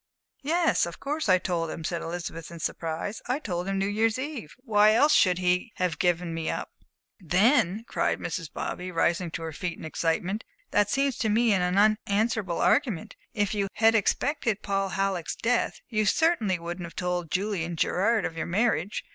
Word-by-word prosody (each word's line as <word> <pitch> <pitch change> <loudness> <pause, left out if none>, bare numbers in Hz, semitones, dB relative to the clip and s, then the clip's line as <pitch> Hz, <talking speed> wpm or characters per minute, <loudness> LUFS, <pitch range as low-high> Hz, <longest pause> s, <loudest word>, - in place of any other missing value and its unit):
"Yes, 330 - +2
of 170 - -8
course 295 -3 -2
I 185 - +7
told 175 -3 -2
him," 160 - -6
said 170 +1 -2
Elizabeth, 165 -1 -5
in 170 - -9
surprise. 165 +6 -3
"I 250 +2 +1
told 180 - -4
him 195 0 -1
New 195 - +1
Year's 220 +3 +1
Eve. 260 - -6
Why 215 -4 +4
else 295 +6 +5
should 180 -2 +4
he 180 +5 0
have 180 -5 -1
given 175 -1 +1
me 165 -1 -3
up?" - - -4 0.5
"Then," 210 - +2
cried - - 0
Mrs. - - -4
Bobby, 180 +1 -4
rising 170 0 +1
to 165 0 -6
her 160 -1 -5
feet 175 +3 -4
in - - -11
her - - -4
excitement, 175 +6 -1 0.3
"that 205 0 +3
seems 275 0 +1
to 220 - +1
me 225 +1 +3
an 180 0 +1
unanswerable 215 -2 +2
argument. 230 - +1 0.2
If 205 -2 0
you 205 -2 0
had 225 +1 +4
had - - +1
expected 230 +1 0
Paul 195 -1 0
Halleck's 190 -3 -1
death, 245 +1 0
you 215 -3 0
certainly 230 - +2
wouldn't 170 +1 -6
have 165 - -14
told 180 -2 -2
Julian 180 -2 -1
Gerard 200 +5 +1
of 165 - -4
your 160 - -3
marriage. 210 +2 0
195 Hz, 190 wpm, -27 LUFS, 175-225 Hz, 0.5 s, I